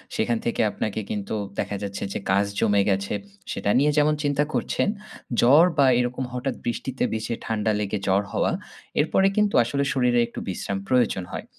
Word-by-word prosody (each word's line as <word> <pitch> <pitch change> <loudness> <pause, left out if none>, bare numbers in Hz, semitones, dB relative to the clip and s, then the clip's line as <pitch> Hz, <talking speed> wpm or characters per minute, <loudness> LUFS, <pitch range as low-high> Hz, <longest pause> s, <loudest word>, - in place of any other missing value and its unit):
সেখান 115 +1 +1
থেকে 120 - 0
আপনাকে 110 +1 -3
কিন্তু, 105 +1 -3 0.2
দেখা 100 - -2
যাচ্ছে 100 0 -4
যে - - -2
কাজ 100 +1 +3
জমে 100 -1 +3
গেছে। 100 +1 0 0.4
সেটা - - -2
নিয়ে 150 +1 +3
যেমন 150 +1 +4
চিন্তা 145 0 +2
করছেন। - - 0 0.5
জ্বর 145 +8 +7
বা 140 - +6
এরকম 125 +1 -1
হঠাৎ 125 0 -2
বৃষ্টিতে 125 +2 -2
ভিজে 110 +1 -2
ঠান্ডা 110 -1 0
লেগে 105 0 -1
জ্বর 95 +1 +3
হওয়া। - - +1 0.5
এরপরে 190 +6 +3
কিন্তু 210 -1 +3
আসলে 140 +4 -1
শরীরে 125 -2 +2
একটু - - -8
বিশ্রাম 95 +1 -3
প্রয়োজন 120 -7 +2
হয়। - - -5
120 Hz, 170 wpm, -24 LUFS, 100-135 Hz, 0.5 s, জ্বর